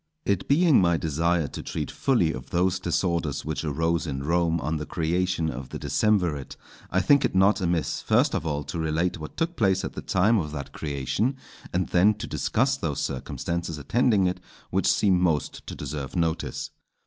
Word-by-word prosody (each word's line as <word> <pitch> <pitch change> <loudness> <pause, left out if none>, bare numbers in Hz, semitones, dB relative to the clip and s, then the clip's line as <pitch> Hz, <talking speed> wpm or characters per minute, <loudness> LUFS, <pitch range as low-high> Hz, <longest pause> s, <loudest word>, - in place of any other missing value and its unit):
_ - - -52 0.2
It 100 -2 0
being 155 - +5
my 85 -2 +3
desire 80 +1 0
to - - -7
treat - - -4
fully 100 -12 +1
of 65 - -8
those 90 +1 +1
disorders 85 -4 -1
which 80 0 -3
arose 80 +1 0
in 70 -2 -3
Rome 85 +1 +1
on 80 +1 -2
the 75 - -4
creation 85 0 0
of 65 +1 -7
the - - -5
decemvirate, 90 -10 0 0.3
I 95 - +2
think 140 +3 +4
it - - 0
not 95 +3 +4
amiss 85 -2 0
first - - +2
of - - -1
all 75 -2 -2
to 85 - -5
relate 80 +3 0
what 75 - -9
took 165 +1 -1
place 95 -3 +2
at - - -5
the - - -6
time 105 +4 +3
of 75 -4 -3
that 70 -3 -6
creation, 75 - -1 0.4
and 90 0 -1
then 100 +5 +4
to 105 +3 -6
discuss 130 +3 0
those 75 - -2
circumstances 85 +4 -3
attending 105 - +2
it 90 0 -1 0.3
which - - +1
seem 95 -3 +3
most 80 -4 -1
to - - -6
deserve 70 +1 -5
notice. 85 -2 -1
85 Hz, 190 wpm, -26 LUFS, 75-95 Hz, 0.4 s, being